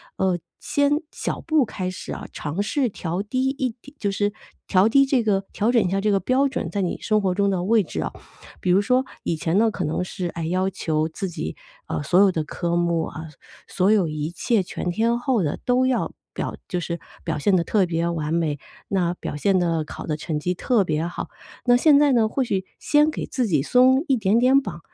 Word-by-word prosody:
呃， 185 Hz, -2 st, +1 dB, 0.2 s
先 285 Hz, 0 st, +1 dB, 0.2 s
小 -, -, -3 dB
步 310 Hz, -5 st, +2 dB
开 185 Hz, -4 st, -4 dB
始 185 Hz, -, -6 dB
啊， -, -, -7 dB
尝 155 Hz, +6 st, -3 dB
试 265 Hz, +4 st, 0 dB
调 175 Hz, -2 st, -3 dB
低 255 Hz, +6 st, -1 dB
一 270 Hz, -2 st, -1 dB
点 280 Hz, -, -14 dB
就 200 Hz, -2 st, 0 dB
是 205 Hz, +1 st, 0 dB, 0.4 s
调 190 Hz, +2 st, +4 dB
低 275 Hz, +4 st, +5 dB
这 265 Hz, -2 st, +2 dB
个 195 Hz, -2 st, +1 dB
调 215 Hz, +3 st, +1 dB
整 235 Hz, -3 st, +4 dB
一 -, -, 0 dB
下 195 Hz, -, +1 dB
这 210 Hz, +1 st, +1 dB
个 195 Hz, -, +3 dB
标 265 Hz, +6 st, +2 dB
准， 265 Hz, -, -3 dB
在 200 Hz, -, -1 dB
你 180 Hz, -, -1 dB
生 215 Hz, -1 st, +2 dB
活 185 Hz, -2 st, 0 dB
中 200 Hz, 0 st, +2 dB
的 185 Hz, -2 st, 0 dB
位 215 Hz, +2 st, +3 dB
置 85 Hz, -, -5 dB
啊。 -, -, -3 dB, 0.5 s
比 180 Hz, -, +1 dB
如 190 Hz, +3 st, +5 dB
说 255 Hz, +4 st, +2 dB, 0.2 s
以 165 Hz, -, -1 dB
前 165 Hz, +3 st, 0 dB
呢 225 Hz, +2 st, +4 dB
可 190 Hz, -, -4 dB
能 160 Hz, +3 st, -1 dB
是， 180 Hz, 0 st, -4 dB
哎， 170 Hz, -1 st, -5 dB
要 185 Hz, +3 st, 0 dB
求 160 Hz, -4 st, -1 dB
自 195 Hz, +4 st, -4 dB
己， 170 Hz, -, -5 dB, 0.3 s
呃， -, -, -2 dB
所 175 Hz, +5 st, +3 dB
有 195 Hz, -1 st, +6 dB
的 160 Hz, -3 st, -1 dB
科 170 Hz, +2 st, -2 dB
目， 170 Hz, -1 st, +1 dB
呃， 160 Hz, -1 st, -8 dB, 0.4 s
所 190 Hz, +3 st, +2 dB
有 200 Hz, -6 st, +3 dB
一 155 Hz, +1 st, -3 dB
切 215 Hz, +3 st, +1 dB
全 180 Hz, 0 st, -4 dB
天 230 Hz, +6 st, +1 dB
候 245 Hz, -6 st, +1 dB
的 150 Hz, -, -2 dB
都 255 Hz, +1 st, +3 dB
要 260 Hz, -1 st, 0 dB, 0.2 s
表 -, -, -3 dB
就 180 Hz, -, -1 dB
是 170 Hz, 0 st, -3 dB, 0.3 s
表 -, -, -1 dB
现 190 Hz, +6 st, +2 dB
得 170 Hz, -, +1 dB
特 200 Hz, -4 st, +2 dB
别 170 Hz, 0 st, -1 dB
完 160 Hz, -2 st, -2 dB
美， 160 Hz, -3 st, 0 dB, 0.3 s
那 180 Hz, -3 st, 0 dB
表 145 Hz, -, -6 dB
现 190 Hz, +5 st, +2 dB
的 165 Hz, -3 st, 0 dB
好 -, -, -7 dB
的 155 Hz, -, 0 dB
成 155 Hz, 0 st, -3 dB
绩 175 Hz, +4 st, -1 dB
特 215 Hz, +3 st, +2 dB
别 155 Hz, 0 st, -1 dB
好。 175 Hz, -, -5 dB, 0.4 s
那 245 Hz, -1 st, +5 dB
现 285 Hz, +3 st, +6 dB
在 290 Hz, -2 st, +4 dB
呢， 225 Hz, -3 st, +3 dB
或 270 Hz, -, -1 dB
许 195 Hz, -5 st, -1 dB
先 300 Hz, +1 st, +3 dB
给 -, -, -4 dB
自 250 Hz, -4 st, -1 dB
己 155 Hz, -7 st, +2 dB
松 260 Hz, -, +4 dB
一 270 Hz, -, +3 dB
点 215 Hz, -1 st, +2 dB
点 260 Hz, +3 st, +5 dB
绑。 215 Hz, -, -7 dB
195 Hz, 250 characters per minute, -23 LUFS, 170-245 Hz, 0.5 s, 有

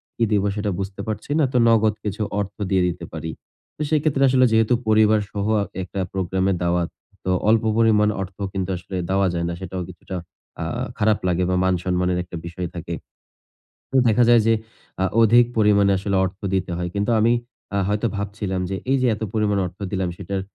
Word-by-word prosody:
কি 115 Hz, -, 0 dB
দিবো 100 Hz, -1 st, +2 dB
সেটা 105 Hz, -1 st, -1 dB
বুঝতে 95 Hz, 0 st, -4 dB
পারছি 110 Hz, +5 st, -4 dB
না, 155 Hz, -, +4 dB
তো -, -, +3 dB
নগদ 110 Hz, -2 st, +4 dB
কিছু 105 Hz, +1 st, -3 dB, 0.2 s
অর্থ 100 Hz, -1 st, -3 dB, 0.2 s
দিয়ে 95 Hz, -1 st, +3 dB
দিতে 85 Hz, -1 st, -4 dB
পারি। 80 Hz, 0 st, -4 dB, 0.4 s
তো -, -, -8 dB
সেক্ষেত্রে 150 Hz, -3 st, +2 dB
আসলে 130 Hz, 0 st, +5 dB
যেহেতু 110 Hz, +1 st, +3 dB
পরিবারসহ 105 Hz, -2 st, +2 dB
অ -, -, +2 dB, 0.2 s
একটা 95 Hz, +2 st, -6 dB
প্রোগ্রামের 95 Hz, 0 st, 0 dB
দাওয়াত। 85 Hz, 0 st, +1 dB, 0.4 s
তো 95 Hz, -, +1 dB, 0.2 s
অল্প 115 Hz, 0 st, +4 dB
পরিমাণ 105 Hz, -2 st, +4 dB
অর্থ 95 Hz, -1 st, -7 dB, 0.2 s
কিন্তু 95 Hz, -1 st, -2 dB
আসলে 90 Hz, +2 st, -8 dB
দেওয়া 95 Hz, 0 st, +2 dB
যায় 85 Hz, 0 st, -1 dB
না। -, -, -2 dB
সেটাও 95 Hz, 0 st, -4 dB
কিছুটা 95 Hz, +1 st, -8 dB, 0.5 s
আ -, -, -1 dB, 0.3 s
খারাপ 105 Hz, 0 st, +2 dB
লাগে 90 Hz, 0 st, +1 dB
বা, 90 Hz, -, +1 dB
মান 95 Hz, 0 st, +3 dB
সম্মানের 90 Hz, 0 st, 0 dB
একটা 90 Hz, -, -10 dB
বিষয় 85 Hz, +1 st, -4 dB
থাকে। -, -, -5 dB, 1.0 s
তো -, -, -4 dB
দেখা 115 Hz, +2 st, +4 dB
যায় 120 Hz, -1 st, +7 dB
যে 115 Hz, -, +5 dB, 0.5 s
আ -, -, +3 dB, 0.2 s
অধিক 120 Hz, +2 st, +6 dB
পরিমাণে 100 Hz, -2 st, +4 dB
আসলে 100 Hz, +1 st, -1 dB
অর্থ 95 Hz, +1 st, -6 dB
দিতে 95 Hz, -2 st, 0 dB
হয়। 90 Hz, 0 st, -2 dB
কিন্তু 100 Hz, +3 st, 0 dB
আমি 115 Hz, +2 st, +4 dB, 0.4 s
আ -, -, +2 dB
হয়তো 105 Hz, +3 st, 0 dB
ভাবছিলাম 100 Hz, -2 st, -3 dB
যে 95 Hz, -, -2 dB, 0.2 s
এইযে 130 Hz, -2 st, +3 dB
এত 110 Hz, -, -13 dB
পরিমাণ 105 Hz, -2 st, +1 dB
অর্থ 90 Hz, +1 st, -8 dB
দিলাম, 95 Hz, -3 st, -1 dB
সেটার 95 Hz, 0 st, -3 dB
100 Hz, 190 wpm, -22 LUFS, 95-110 Hz, 1.0 s, যায়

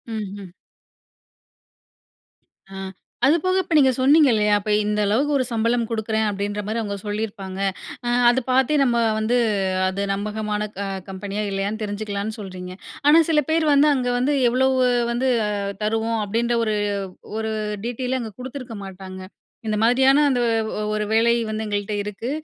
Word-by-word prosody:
ம்ஹம். 200 Hz, -2 st, -6 dB, 2.2 s
ஆ. -, -, -7 dB, 0.5 s
அது 300 Hz, +5 st, +5 dB
போக 370 Hz, 0 st, +2 dB
இப்ப 355 Hz, -, -4 dB
நீங்க 265 Hz, -3 st, +5 dB
சொன்னீங்க 290 Hz, +3 st, +6 dB
இல்லையா, 210 Hz, -1 st, +2 dB
அப்ப 205 Hz, -, -6 dB
இந்த 210 Hz, 0 st, -1 dB
அளவுக்கு 250 Hz, +9 st, +1 dB
ஒரு 260 Hz, -, 0 dB
சம்பளம் 230 Hz, 0 st, 0 dB
கொடுக்குறேன் 220 Hz, -1 st, -1 dB
அப்படின்ற 205 Hz, +1 st, -3 dB
மாதிரி 220 Hz, +2 st, -1 dB
அவங்க 205 Hz, -2 st, -3 dB
சொல்லியிருப்பாங்க. 205 Hz, -2 st, -4 dB, 0.5 s
அ -, -, +1 dB, 0.2 s
அது 245 Hz, +2 st, +3 dB
பார்த்தே 265 Hz, +3 st, +3 dB
நம்ம 240 Hz, -3 st, +2 dB, 0.2 s
வந்து 220 Hz, +3 st, +1 dB, 0.5 s
அது 190 Hz, +1 st, -2 dB
நம்பகமான 210 Hz, +1 st, -2 dB, 0.2 s
அ -, -, -3 dB, 0.2 s
கம்பெனியா 195 Hz, +2 st, -4 dB
இல்லையான்னு 200 Hz, +2 st, -2 dB
தெரிஞ்சுக்கலான்னு 205 Hz, +1 st, -4 dB
சொல்றீங்க. 185 Hz, -2 st, -7 dB, 0.4 s
ஆனா 300 Hz, +2 st, +7 dB
சில 310 Hz, -2 st, +4 dB
பேர் 320 Hz, 0 st, +2 dB
வந்து 285 Hz, +1 st, +5 dB
அங்க 255 Hz, -3 st, -1 dB
வந்து 260 Hz, +4 st, +1 dB, 0.2 s
எவ்வளோ 255 Hz, +2 st, +2 dB, 0.4 s
வந்து 250 Hz, +2 st, 0 dB, 0.5 s
தருவோம் 225 Hz, +1 st, 0 dB
அப்படின்ற 230 Hz, +4 st, 0 dB
ஒரு, 215 Hz, -1 st, 0 dB, 0.6 s
ஒரு 220 Hz, 0 st, -2 dB, 0.3 s
டிடெய்லே 250 Hz, +2 st, -2 dB
அங்க 225 Hz, -3 st, -6 dB
குடுத்துருக்க 255 Hz, -2 st, -7 dB
மாட்டாங்க. 190 Hz, 0 st, -9 dB, 0.5 s
இந்த 215 Hz, -1 st, 0 dB
மாதிரியான 265 Hz, +5 st, +5 dB
அந்த 250 Hz, -2 st, +1 dB, 0.5 s
ஒரு 210 Hz, 0 st, -1 dB
வேலை 230 Hz, +1 st, +4 dB, 0.2 s
வந்து 215 Hz, 0 st, -3 dB
எங்கள்ட்ட 205 Hz, 0 st, -2 dB
இருக்கு. 210 Hz, +3 st, -5 dB
220 Hz, 145 wpm, -22 LUFS, 205-250 Hz, 2.2 s, ஆனா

